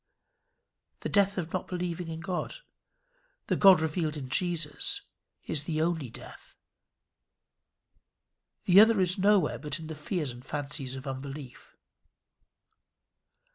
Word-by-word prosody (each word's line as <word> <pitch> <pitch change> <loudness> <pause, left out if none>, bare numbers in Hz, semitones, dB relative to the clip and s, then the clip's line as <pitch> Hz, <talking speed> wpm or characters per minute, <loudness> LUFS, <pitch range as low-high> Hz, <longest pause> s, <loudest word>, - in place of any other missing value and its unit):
The - - -3
death 200 -1 +3
of 170 -3 -3
not 185 - -2
believing 180 -1 -3
in 165 0 -6
God 180 0 -3 0.9
the - - 0
God 190 -4 +7
revealed 155 -1 -1
in 130 -3 -6
Jesus 165 0 -1 0.4
is 145 -2 -2
the 155 -2 -2
only 160 -5 0
death. - - -13 2.1
The 185 +2 +7
other 220 0 +7
is 185 +1 +2
nowhere 200 0 +3
but 150 0 -3
in 160 - -8
the 160 - -6
fears 150 -2 -3
and 120 +1 -11
fancies 140 -2 -4
of 130 +1 -8
unbelief. 135 0 -8
160 Hz, 125 wpm, -29 LUFS, 145-180 Hz, 2.1 s, God